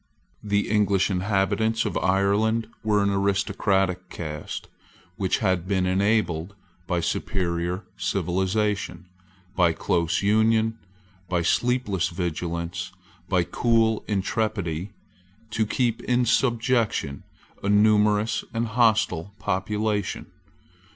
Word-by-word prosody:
The 100 -1 0
English 100 -2 +2
inhabitants 100 +4 +1
of - - -2
Ireland 100 +4 +2 0.2
were 105 -1 +2
an 100 - +2
aristocratic 100 -1 0
caste, 75 -3 -6 0.5
which 95 -1 0
had 95 -2 +1
been 95 -2 +1
enabled, 95 -2 +1 0.3
by 90 -2 0
superior 90 +1 -2
civilisation, 95 +2 -1 0.5
by 90 -3 +3
close 85 +2 0
union, 110 +2 +2 0.5
by 90 -2 +1
sleepless 115 -4 +1
vigilance, 85 0 -3 0.4
by 90 -3 +3
cool 115 +2 +1
intrepidity, 100 -4 -1 0.6
to 110 0 0
keep 120 0 0
in 125 0 +2
subjection 115 - +1 0.4
a 100 - -2
numerous 105 +1 +3
and 115 0 -1
hostile 105 -5 +2
population. 105 +1 -2
100 Hz, 95 wpm, -25 LUFS, 90-110 Hz, 0.6 s, by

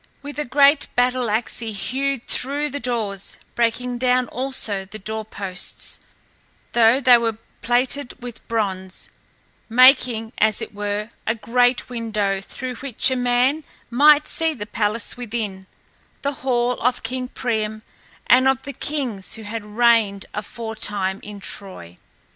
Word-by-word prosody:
With 290 +1 -6
a 295 - -1
great 280 +3 +4
battle 250 -1 +2
axe 220 +3 0
he 225 -2 -4
hewed 265 +5 -2
through 285 +3 0
the 285 - -3
doors, 225 -6 -2 0.2
breaking 240 +1 0
down 250 0 +2
also 250 -6 -1
the 200 +3 -9
door 220 +2 -4
posts, 195 -3 -2 0.7
though 235 +2 +5
they 250 -3 +6
were 225 -2 -1 0.2
plated 245 +2 0
with 245 -2 -9
bronze, 190 -4 -3 0.6
making, 240 -2 +5
as 215 0 +3
it - - -6
were, 205 +1 -3 0.2
a 225 - +2
great 245 +2 +2
window, 215 -5 -1
through 250 +4 -6
which 265 0 +2
a - - +1
man 250 +5 +2 0.3
might 295 +4 +6
see 325 -1 0
the 210 -5 -6
palace 210 +2 -1
within, 210 -5 -4 0.6
the 280 +1 0
hall 245 -1 0
of 250 +1 +1
King 255 +2 -3
Priam 220 -4 -2 0.5
and 255 +2 +5
of 265 -2 +2
the 280 - -6
kings 250 -9 -4
who 225 - -9
had 215 +1 -5
reigned 225 -5 +3
aforetime 210 -3 -3
in 205 -1 -9
Troy. 185 - -5
235 Hz, 140 wpm, -22 LUFS, 210-255 Hz, 0.7 s, they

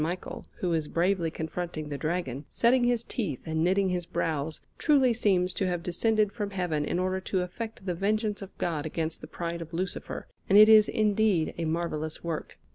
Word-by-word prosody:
Michael, 170 +4 -4
who 175 -2 -1
is 160 -2 0
bravely 175 0 +1
confronting 160 -1 -5
the 145 - -3
Dragon, 155 -5 -2
setting 240 +1 +3
his 240 -1 +2
teeth 190 - -3
and 160 0 0
knitting 190 +2 +2
his 180 -1 -2
brows, 155 -2 -2 0.2
truly 270 -5 +4
seems 185 -5 +2
to 190 - -1
have 175 -2 -2
descended 210 +4 +2
from 205 -3 -3
Heaven 175 -6 -1
in 170 - -1
order 185 +1 0
to 190 0 -1
effect 220 +3 -6
the 180 - 0
vengeance 210 +3 0
of 195 - -10
God 155 -3 -1
against 160 0 -3
the - - -8
pride 170 0 -4
of 165 0 -8
Lucifer, 185 +1 -4 0.2
and 195 - +6
it 215 +1 +9
is 215 -1 +8
indeed 210 -5 +2
a 165 - -1
marvellous 160 -1 -2
work. 165 -2 -4
180 Hz, 195 wpm, -28 LUFS, 160-205 Hz, 0.2 s, it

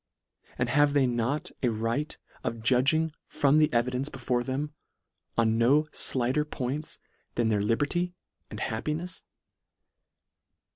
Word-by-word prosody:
and 120 0 0
have 145 +2 +4
they 140 -2 +4
not 120 +4 -1
a 125 - +2
right 115 +7 -2 0.3
of 115 -1 -3
judging 140 +7 +3 0.2
from 145 +1 +3
the 155 - +4
evidence 125 +3 0
before 125 -1 -1
them, 140 +4 -3 0.6
on 115 -1 +3
no 145 +6 +4 0.3
(lighter 130 +4 +2
points 150 0 -4 0.4
than 120 -2 +2
their 105 -2 +2
liber 115 +7 +2
ty 175 +4 -1 0.4
and - - -7
happinefs 155 +10 -3
130 Hz, 130 wpm, -28 LUFS, 120-150 Hz, 0.6 s, have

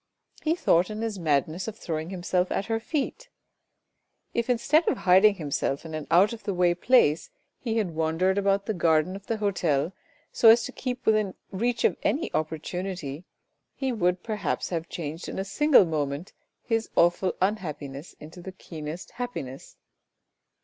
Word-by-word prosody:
He 320 +1 +1
thought 180 - +3
in 215 +1 -4
his 220 -4 -3
madness 155 - 0
of 220 -1 -6
throwing 160 -4 -4
himself 180 0 -1
at 195 - -1
her 225 +1 -1
feet. 310 - -3 1.0
If 235 +1 -1
instead 280 +7 +3
of - - +2
hiding 190 +3 +5
himself 145 -3 -2
in 160 - -7
an 155 -1 -5
out 185 +7 +5
of 230 - -8
the 200 - -2
way 175 -1 +3
place, 175 - +3 0.3
he 230 -3 -2
had 195 -7 0
wandered 165 +5 +1
about 200 0 +1
the 220 - -1
garden 165 0 +2
of 200 0 -10
the 225 - -1
hotel 175 -6 0 0.4
so 230 - +6
as 230 +2 +7
to 260 - -5
keep 255 -1 -5
within 215 -3 +2 0.2
reach 235 +4 -1
of - - +3
any 300 - 0
opportunity, 160 0 -3 0.5
he 265 -1 -1
would 180 -5 0
perhaps 215 -2 -2
have 170 -1 -3
changed 160 0 -5
in - - -6
a 190 - -2
single 290 +2 +5
moment 150 0 -3 0.3
his 225 -1 -1
awful 175 +2 +3
unhappi 180 -7 -1
ness 140 +5 -10
into 160 +4 -11
the 190 - -7
keenest 160 -1 -8
happiness. 235 - -6
185 Hz, 170 wpm, -27 LUFS, 160-220 Hz, 1.0 s, as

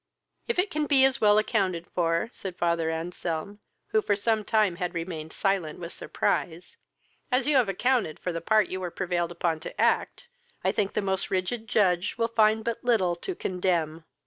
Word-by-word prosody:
"If 470 - -1
it 370 +2 +1
can 300 0 -1
be 270 -2 +6
as 270 0 +1
well 210 -1 +5
accounted 190 -6 0
for 170 +5 0
(said 185 -2 -6
father 170 -1 +1
Anselm) 165 +3 -4 0.3
who 435 - +2
for 205 - +1
some 215 +1 0
time 210 -4 +2
had 180 -1 -3
remained 165 -2 -5
silent 190 -6 -1
with 170 -1 -7
surprise,) 175 +1 -2 0.6
as 250 +2 +2
you 295 0 +2
have 240 -6 +3
accounted 230 - +1
for 180 - -3
the 165 - -3
part 215 +2 +3
you 185 - -3
were 180 -1 -3
prevailed 175 -1 -2
upon 170 -2 -1
to 155 - -9
act, - - +1 0.4
I - - +3
think 200 -1 -1
the 210 - 0
most 190 -1 -1
rigid 205 +5 -2
judge 185 -4 +1
will 230 0 +1
find 220 -1 +3
but 230 0 -3
little 205 -8 +2
to 375 - -4
condemn." 170 - -1
190 Hz, 190 wpm, -27 LUFS, 170-220 Hz, 0.6 s, be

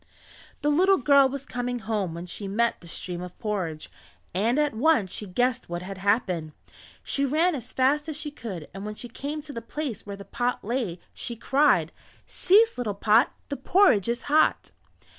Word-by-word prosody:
The 295 - +3
little 375 +6 +4
girl 275 0 +5
was 275 0 -5
coming 245 -2 -3
home 215 -7 -2
when 170 +1 -6
she 195 +3 -5
met 230 +4 0
the 170 - -13
stream 175 +1 -5
of 180 0 -8
porridge, 185 -9 -3 0.5
and 220 +8 +1
at 295 -1 +2
once 225 - +2
she 210 - -3
guessed 245 +6 0
what 175 +1 -4
had 195 0 -7
happened. 185 -6 0 0.5
She 280 - 0
ran 315 +6 +2
as 250 -4 -6
fast 290 +4 +1
as 305 - -4
she 300 -1 -5
could 195 - -7
and 195 +1 -7
when 210 0 -5
she 245 - -7
came 290 +5 -5
to 290 -1 -9
the 230 - -5
place 250 -1 -5
where 200 -1 -7
the 200 - -10
pot 245 0 -2
lay 220 -7 -2
she 235 - -4
cried: 255 - +3 0.3
"Cease 430 - +3
little 215 -5 -2
pot, 220 +5 +4 0.2
The 280 - -3
porridge 270 - +4
is 240 +1 -2
hot." 305 +2 +2
235 Hz, 190 wpm, -26 LUFS, 195-285 Hz, 0.5 s, girl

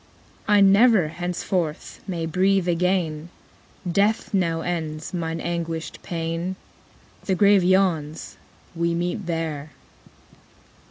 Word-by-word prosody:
'I 205 -1 +5
never, 200 -3 +5
henceforth, 175 -1 -3
may 170 -4 -2
breathe 185 +3 +2
again; 175 -2 0 0.6
Death 205 +5 +1
now 165 -4 +1
ends 160 -2 -4
mine 165 -2 -3
anguished 165 -1 -4
pain. 165 +2 -3 0.7
The 190 - +1
grave 200 0 +5
yawns, 175 -5 +1 0.4
we 170 0 0
meet 175 +2 -2
there.' 160 -3 -3
175 Hz, 100 wpm, -23 LUFS, 165-190 Hz, 0.7 s, I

